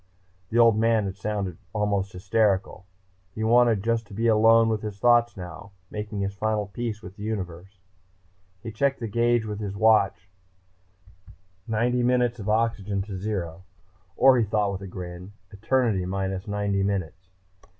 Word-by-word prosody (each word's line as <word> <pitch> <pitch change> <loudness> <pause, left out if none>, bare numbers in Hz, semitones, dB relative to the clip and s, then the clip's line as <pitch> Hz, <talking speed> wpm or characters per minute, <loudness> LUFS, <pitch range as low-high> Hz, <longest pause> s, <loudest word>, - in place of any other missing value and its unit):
The 115 - -1
Old 115 -2 +5
Man 115 -2 +2
had 95 -1 -4
sounded 100 -4 -4
almost 100 -2 -1
hysterical. 95 0 0 0.5
He 110 - -3
wanted 115 -2 +4
just 115 -1 0
to 100 - -11
be 115 +3 -1
alone 115 0 +5
with 110 -1 -1
his 105 -2 -6
thoughts 120 0 +3
now, 95 +2 -9 0.2
making 105 -1 -4
his 100 0 -2
final 105 +1 -1
peace 110 +2 -5
with 95 +3 -11
the - - -11
universe.... 95 -3 -5 0.9
He 115 - -5
checked 135 +5 0
the 115 - -4
gauge 120 +1 +1
with 105 -1 -5
his 100 -2 -4
watch 105 -4 +3 1.4
ninety 120 +3 +1
minutes 120 -1 +1
of 105 0 -5
oxygen 105 -3 0
to 100 -1 -7
zero. 90 -4 -4 0.5
Or, 130 -1 +6
he - - +3
thought 105 -1 0
with 95 0 -5
a 100 - -7
grin, 90 +1 -8 0.2
eternity 110 -1 0
minus 95 0 -3
ninety 100 -1 -1
minutes. 95 -2 -3
105 Hz, 160 wpm, -25 LUFS, 95-115 Hz, 1.4 s, Or